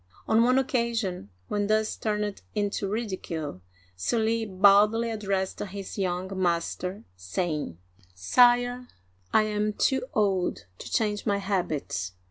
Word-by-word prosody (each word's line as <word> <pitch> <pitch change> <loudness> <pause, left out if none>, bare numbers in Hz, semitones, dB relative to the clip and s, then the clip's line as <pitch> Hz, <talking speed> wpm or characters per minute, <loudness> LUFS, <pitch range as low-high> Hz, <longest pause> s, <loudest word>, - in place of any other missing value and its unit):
On 220 - +4
one 250 +2 +4
occasion, 235 - -1 0.2
when 205 -1 -1
thus 215 0 +1
turned 210 -2 -2
into 205 -1 -1
ridicule. 185 - -4 0.3
Sully 225 - 0
boldly 205 +4 +5
addressed 195 -3 -2
his 200 -1 -6
young 190 0 -2
master, 180 +2 -1
saying: 90 - -3 0.2
" 90 -2 -30
Sire, 245 - +4 0.4
I 220 - +5
am 210 0 -1
too 265 +5 +2
old 195 -4 +1
to - - -8
change 210 -2 0
my 200 -1 +2
habits. 175 - -2
205 Hz, 120 wpm, -27 LUFS, 180-220 Hz, 0.4 s, boldly